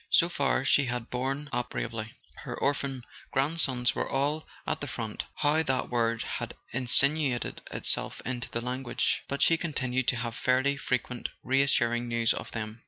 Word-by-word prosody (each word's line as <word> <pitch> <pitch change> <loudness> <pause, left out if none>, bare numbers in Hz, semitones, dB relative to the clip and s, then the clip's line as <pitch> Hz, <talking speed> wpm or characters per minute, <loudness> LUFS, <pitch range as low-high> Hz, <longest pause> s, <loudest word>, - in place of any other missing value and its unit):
So 170 - +5
far 140 -4 +1
she 140 0 +4
had 125 -1 -4
borne 135 +4 -2
up 125 0 -1
bravely. 115 -1 -4 0.2
Her - - -6
orphan 135 -2 0 0.3
grand¬ 145 +5 +1
sons 125 -5 +4
were - - -2
all 145 +3 0 0.2
at - - -2
the - - -3
front - - -4
(how 150 +2 +3
that 130 -4 -1
word 115 -1 +1
had - - -4 0.2
in¬ 125 +1 -2
sinuated 140 -1 +3
itself - - 0
into 125 -1 -3
the 115 - -3
language!) 125 +1 -1
but 140 - 0
she 165 - +5
continued 130 -6 -1
to - - +4
have 115 -1 -3
fairly 130 +3 +2
frequent 125 -3 -2
reassuring 120 -3 +2
news 115 -1 +2
of - - -6
them. 110 0 -5
130 Hz, 170 wpm, -29 LUFS, 120-140 Hz, 0.3 s, So